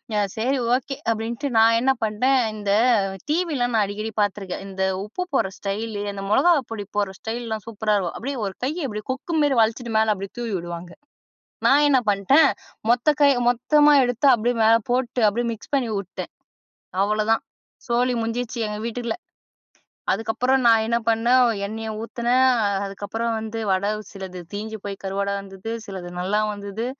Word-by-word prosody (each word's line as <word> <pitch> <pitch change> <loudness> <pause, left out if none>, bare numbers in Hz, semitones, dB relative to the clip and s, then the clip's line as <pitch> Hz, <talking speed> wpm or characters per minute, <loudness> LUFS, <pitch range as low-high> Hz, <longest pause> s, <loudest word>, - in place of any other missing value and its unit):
"எ - - +2 0.2
சரி 260 +5 +1 0.2
ஓக்கே" 265 +2 -1 0.2
அப்படின்ட்டு 230 +5 -3
நான் 225 +1 +6
என்ன 260 +3 +3
பண்ட்டேன், 250 +5 +2
இந்த 205 -2 -2 0.6
டிவிலாம் 300 -7 0
நான் 215 - +4
அடிக்கடி 215 +2 -4
பாத்துருக்கேன். 195 -2 -2
இந்த 190 -1 -3 0.2
உப்பு 225 +13 -4
போடுற 190 -8 +1
ஸ்டைலு, 205 +1 -3
அந்த 195 0 -6
மொளகா 345 +11 +5 0.2
பொடி 210 -3 -4
போடுற 200 -2 0
ஸ்டைலுலாம் 225 -2 -4
சூப்பரா 215 -1 0
இருக்கும். 175 -3 -3
அப்டியே 275 +2 -4
ஒரு 195 -1 -4
கைய 310 +6 -2
இப்டியே, 210 -2 -6
கொக்கு 270 +6 -4
மேரி 275 -3 +2
வளச்சுட்டு 225 +1 0
மேல 220 0 +3
அப்டியே 195 0 -7
தூவி 230 -3 -3
உடுவாங்க. 170 0 -7 0.8
நான் 290 +2 +5
என்ன 275 -2 +5
பண்ட்டேன், 205 +10 +5 0.4
மொத்த 245 +4 +2
கை 285 -1 +7 0.2
மொத்தமா 295 +5 +4
எடுத்து 245 +2 0
அப்டியே 240 +1 0
மேல 225 +1 +6 0.2
போட்டு, 250 0 0
அப்டியே 235 +3 -1
மிக்ஸ் 225 +5 -11
பண்ணி 265 -4 +1
உட்டேன். 195 -1 -7 0.7
அவ்வளோ 215 +1 +1
தான் 225 - +3 0.5
சோலி 245 +1 +2
முடிஞ்ச்சு 235 +1 -3
எங்க 210 0 -4
வீட்டுல்ல. 235 +3 -3 1.0
அதுக்கப்புறம் 225 +5 +1
நான் 225 -1 +6
என்ன 235 +1 +1
பண்ணன்? 240 +3 +4 0.2
எண்ணெய 220 +2 -5
ஊத்துனேன் 245 +3 +2 0.4
அதுக்கப்புறம் 205 +4 -3
வந்து 220 +1 -5
வடை 190 +2 +1 0.2
சிலது 190 -2 -7
தீஞ்சு 220 +2 -4
போய் 200 -1 -5
கருவாடா 200 +1 -1
வந்தது, 195 +2 -8 0.2
சிலது 185 -3 -7
நல்லா 200 +4 +1
வந்துது. 205 +3 -5
225 Hz, 160 wpm, -23 LUFS, 205-245 Hz, 1.0 s, கை